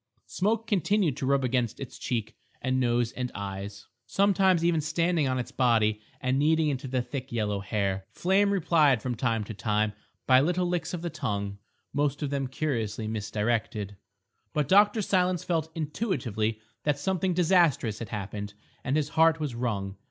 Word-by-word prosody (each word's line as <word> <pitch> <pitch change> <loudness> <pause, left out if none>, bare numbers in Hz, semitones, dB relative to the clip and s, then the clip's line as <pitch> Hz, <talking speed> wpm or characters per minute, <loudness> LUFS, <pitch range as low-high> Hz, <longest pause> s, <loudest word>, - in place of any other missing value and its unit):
Smoke 220 +4 0
continued 200 - +1
to 135 - -2
rub 140 0 +2
against 125 -3 0
its 135 - -8
cheek 110 -3 -3 0.2
and 130 0 0
nose 120 -1 +1
and 125 -1 -4
eyes, 100 0 -6 0.2
sometimes 190 0 +3
even 170 -2 +3
standing 165 0 +1
on 130 0 0
its 125 - -4
body 110 -4 +2 0.2
and 130 +1 0
kneading 155 +1 +3
into 135 -1 -3
the 125 -1 -1
thick 130 0 -6
yellow 105 -3 -1
hair. 100 -2 -2
Flame 195 +3 +2
replied 160 - +3
from 125 +3 -3
time 115 -2 0
to 110 - -7
time 105 0 0 0.3
by 130 0 +6
little 180 +4 +1
licks 175 -1 -1
of 170 - -7
the 170 - -3
tongue, 100 -8 -3 0.3
most 145 +1 0
of 140 - -2
them 140 -2 -1
curiously 115 -6 -2
misdirected. 105 -1 -2 0.6
But 150 -2 0
Dr. 205 +2 +5
Silence 180 -2 +1
felt 160 -2 -1
intuitively 125 - -2 0.2
that 150 -1 +1
something 185 +3 0
disastrous 165 - +3
had 115 - -6
happened, 105 0 -5 0.3
and 135 +3 0
his 150 -1 0
heart 160 0 +4
was 150 -5 -2
wrung. 100 -5 -3
130 Hz, 165 wpm, -28 LUFS, 110-165 Hz, 0.6 s, by